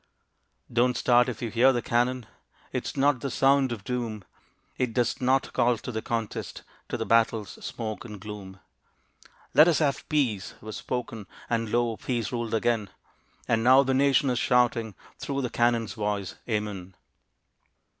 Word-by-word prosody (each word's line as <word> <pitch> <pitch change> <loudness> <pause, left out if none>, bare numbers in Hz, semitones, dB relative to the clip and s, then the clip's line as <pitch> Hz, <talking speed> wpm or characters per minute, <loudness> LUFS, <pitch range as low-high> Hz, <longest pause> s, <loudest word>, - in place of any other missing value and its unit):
Don't 120 0 +2
start 125 +1 +4
if 120 -1 -6
you 115 - -3
hear 125 +4 +5
the 120 -2 -1
cannon, 120 +1 0 0.5
It - - -2
is - - -6
not 140 -1 +3
the 140 - -3
sound 135 0 +3
of 110 -4 -5
doom, 115 -3 -3 0.5
It 125 -3 -2
does 120 0 0
not 130 +1 +1
call 120 0 +2
to 125 - -7
the 110 -1 -3
contest 115 -2 -4 0.3
To - - -2
the - - -3
battle's 115 -3 +1
smoke 110 -2 -5
and 105 -4 -9
gloom. 100 -2 -9 0.9
"Let 150 +4 +7
us 170 - +3
have 145 -3 -1
peace," 120 - 0
was 110 0 -8
spoken, 115 -4 -5 0.2
And 115 -1 0
lo! 120 -2 +1
peace 120 -4 -2
ruled 115 -2 -2
again; 110 -3 0 0.6
And 115 -1 +1
now 130 +3 +7
the 135 0 0
nation 135 0 +3
is 125 - 0
shouting, 120 -5 +2 0.2
Through 140 -1 -3
the 125 - -3
cannon's 120 -2 +1
voice, 105 -3 -2 0.2
"Amen." 100 -4 -3
120 Hz, 165 wpm, -27 LUFS, 110-130 Hz, 0.9 s, Let